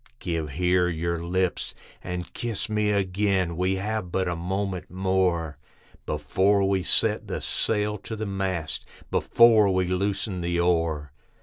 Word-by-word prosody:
Give 85 -7 -3
here 90 +4 +2
your 85 0 -2
lips 90 +1 -1 0.3
and 90 -1 -5
kiss 115 -2 -3
me 105 -1 +1
again, 95 -2 +1
we 90 +2 +1
have 100 -2 -3
but 95 0 0
a 90 - -1
moment 95 +2 -3
more, 90 -4 0 0.5
Before 95 +7 +2
we 95 -1 +1
set 90 - +1
the - - -3
sail 105 -1 -1
to 110 - -6
the 110 0 -4
mast, 95 -5 -2 0.3
before 115 -3 +5
we 95 -1 +2
loosen 95 0 -1
the 85 0 0
oar. 80 -4 +1
95 Hz, 140 wpm, -26 LUFS, 85-100 Hz, 0.5 s, before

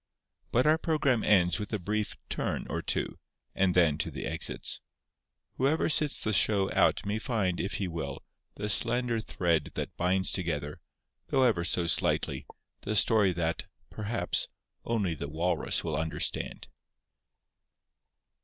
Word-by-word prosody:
But 125 - +3
our 155 +1 +4
programme 145 -8 +1
ends 90 -2 +4
with 105 - -5
a 105 - 0
brief 105 +3 -2
"turn" - - -2
or - - -2
two; - - -2 0.3
and 95 -2 +1
then 80 -4 +4
to - - -1
the - - -6
exits. - - 0 0.8
Whoever 140 +6 +2
sits 150 -1 +2
the 110 - 0
show 100 0 +3
out - - +2
may 105 +2 -1
find, 105 -8 -1
if 95 - -2
he 95 - -2
will, 80 -6 -5 0.3
the 105 - -4
slender 120 +3 +1
thread 85 -8 0
that - - -4
binds 95 +1 +2
together, 75 -5 -2 0.5
though 135 - +2
ever 110 -9 +3
so 85 0 +1
slightly, 85 - 0 0.3
the 105 - -3
story 105 -2 +6
that, 85 -1 -2 0.3
perhaps, 110 +2 -2 0.4
only 105 -7 0
the 70 -2 -6
Walrus 85 +4 0
will 80 -2 -2
understand. 80 +1 -2
95 Hz, 145 wpm, -29 LUFS, 85-115 Hz, 0.8 s, story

